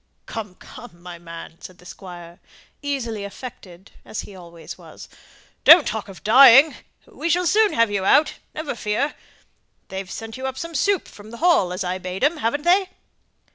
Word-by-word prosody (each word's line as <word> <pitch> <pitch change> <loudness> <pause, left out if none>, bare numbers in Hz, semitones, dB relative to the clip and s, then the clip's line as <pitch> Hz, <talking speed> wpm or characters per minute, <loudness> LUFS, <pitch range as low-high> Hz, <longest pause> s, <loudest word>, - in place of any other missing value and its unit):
"Come, 210 -5 -7
come, 200 -4 -14
my 175 -1 -10
man!" 165 -1 -11
said 185 - -11
the 180 - -20
Squire, 175 -2 -11 0.4
easily 245 -7 -4
affected, 200 -4 -11
as - - -6
he 200 - -12
always 170 -2 -11
was. 165 -3 -13 0.6
"Don't 320 -1 +8
talk 220 -2 -4
of 195 -3 -13
dying, 270 +5 +7 0.3
we 335 - -5
shall 360 +2 +1
soon 420 +4 +3
have 230 -2 +2
you 200 -2 -1
out, 295 +10 +4 0.2
never 310 -1 -4
fear. 230 +6 -2 0.8
They've 190 -1 -6
sent 225 +3 -8
you 260 0 -4
up 265 0 -6
some 335 +3 -6
soup 390 +6 0
from 205 +1 -14
the 235 - -10
Hall, 325 - +3
as 185 +2 -3
I 185 +1 -3
bade 185 +4 -6
'em, 310 +4 +2
haven't 290 +2 -2
they?" 370 +2 +3
220 Hz, 175 wpm, -22 LUFS, 185-285 Hz, 0.8 s, Don't